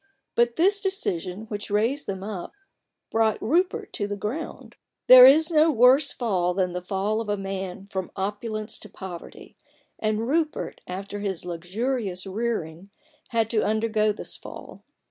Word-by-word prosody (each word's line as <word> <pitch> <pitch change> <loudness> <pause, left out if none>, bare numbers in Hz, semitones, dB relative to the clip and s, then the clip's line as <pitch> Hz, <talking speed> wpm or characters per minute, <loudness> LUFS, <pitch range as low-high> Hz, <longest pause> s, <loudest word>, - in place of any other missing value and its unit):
But 235 0 +2
this 395 +4 +3
decision, 190 - -2
which 210 -1 -5
raised 225 +8 0
them 190 -1 -4
up, 200 -4 -6 0.6
brought 225 -1 +2
Rupert 345 - 0
to 205 - -2
the 205 - -3
ground. 235 +11 -6 0.3
There 255 0 +11
is 315 +5 +5
no 315 0 +5
worse 265 +3 +5
fall 180 -7 0
than 185 -2 0
the 180 - -3
fall 200 +4 -1
of 220 - -6
a 205 - 0
man 195 -1 -5
from 190 -1 -3
opulence 215 +2 -3
to 215 - -10
poverty; 185 -3 -10 0.4
and 215 +1 -1
Rupert, 310 +2 -1
after 200 +3 -6
his 195 -4 -3
luxurious 185 +3 -3
rearing, 195 -4 -3 0.4
had 230 -3 +1
to 220 -2 +2
undergo 215 0 +1
this 210 - -7
fall. - - -11
215 Hz, 150 wpm, -25 LUFS, 190-240 Hz, 0.6 s, There